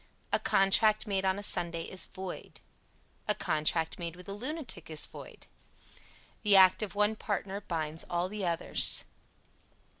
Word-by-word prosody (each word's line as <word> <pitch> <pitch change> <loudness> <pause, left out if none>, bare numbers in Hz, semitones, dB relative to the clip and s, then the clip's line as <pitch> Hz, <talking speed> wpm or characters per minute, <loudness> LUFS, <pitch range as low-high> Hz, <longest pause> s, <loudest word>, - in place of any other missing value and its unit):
A - - +3
contract 210 +3 +2
made 195 -2 -2
on 190 0 +1
a 205 - -6
Sunday 170 -3 -1
is 185 - -6
void. 185 -1 -9 0.7
A - - +2
contract 160 +2 -1
made 170 -1 -5
with 180 0 -14
a 200 - -5
lunatic 250 - -5
is 155 -1 -1
void. - - -13 1.0
The 210 -2 +4
act 185 +1 +6
of 210 -1 -5
one 210 +1 +2
partner 200 -2 -4
binds 160 -3 -4
all 175 +1 -1
the 210 +1 -6
others. 170 -2 +5
190 Hz, 150 wpm, -30 LUFS, 170-205 Hz, 1.0 s, act